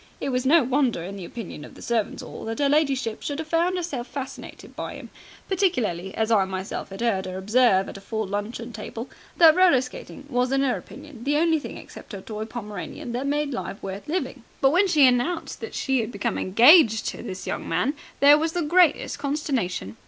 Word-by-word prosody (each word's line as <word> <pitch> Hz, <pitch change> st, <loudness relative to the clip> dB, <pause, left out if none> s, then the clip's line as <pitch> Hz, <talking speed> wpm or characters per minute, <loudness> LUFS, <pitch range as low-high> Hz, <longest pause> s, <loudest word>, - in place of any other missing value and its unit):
It -, -, -2 dB
was 255 Hz, 0 st, 0 dB
no 320 Hz, +1 st, +6 dB
wonder, 255 Hz, -, +1 dB
in 195 Hz, +3 st, -6 dB
the 190 Hz, -3 st, -7 dB
opinion 190 Hz, -8 st, -8 dB
of -, -, -12 dB
the -, -, -13 dB
Servants' 230 Hz, -3 st, -1 dB
'All, -, -, -9 dB
that 225 Hz, 0 st, -4 dB
'er 285 Hz, -, +3 dB
ladyship 275 Hz, -6 st, +1 dB
should 285 Hz, -, -3 dB
have 320 Hz, 0 st, -5 dB
found 340 Hz, +3 st, +1 dB
'erself 285 Hz, -9 st, -4 dB
fascinated 270 Hz, -2 st, -8 dB
by -, -, -5 dB
him, -, -, -10 dB, 0.4 s
particularly 240 Hz, -, 0 dB
as 220 Hz, 0 st, 0 dB
I 210 Hz, -4 st, +5 dB
myself 190 Hz, +1 st, -5 dB
'ad 195 Hz, +4 st, -5 dB
'eard 195 Hz, -5 st, +1 dB
her 185 Hz, 0 st, -5 dB
observe 200 Hz, -1 st, +3 dB
at -, -, -8 dB
a -, -, -11 dB
full 220 Hz, +2 st, -3 dB
luncheon 210 Hz, +4 st, -5 dB
table 225 Hz, +2 st, -7 dB, 0.3 s
that 320 Hz, -2 st, +8 dB
roller 365 Hz, -8 st, +5 dB
skating 255 Hz, +2 st, -8 dB
was 250 Hz, -2 st, 0 dB
in 270 Hz, 0 st, +2 dB
her 260 Hz, -2 st, +1 dB
opinion 285 Hz, -5 st, -11 dB
the 290 Hz, +3 st, +1 dB
only 325 Hz, 0 st, +3 dB
thing -, -, -8 dB
except -, -, -12 dB
her 195 Hz, -, -6 dB
toy 215 Hz, +1 st, -6 dB
Pomeranian 215 Hz, 0 st, -7 dB
that 250 Hz, +4 st, -2 dB
made 290 Hz, 0 st, 0 dB
life 220 Hz, -, -4 dB
worth 195 Hz, +6 st, -6 dB
living. 280 Hz, -6 st, -3 dB, 0.2 s
But 270 Hz, -, +4 dB
when 370 Hz, +5 st, +4 dB
she 305 Hz, -6 st, +5 dB
announced 255 Hz, +7 st, 0 dB
that -, -, -7 dB
she 265 Hz, -1 st, +1 dB
had 225 Hz, 0 st, -2 dB
become 210 Hz, +1 st, -2 dB
engaged 225 Hz, -, +6 dB
to -, -, -7 dB
this 185 Hz, 0 st, -7 dB
young -, -, -4 dB
man, 180 Hz, -, +1 dB, 0.3 s
there 290 Hz, +1 st, +8 dB
was 320 Hz, +1 st, -1 dB
the 350 Hz, -, -1 dB
greatest 340 Hz, 0 st, +3 dB
consternation. 265 Hz, -, -2 dB
250 Hz, 210 wpm, -24 LUFS, 210-295 Hz, 0.4 s, that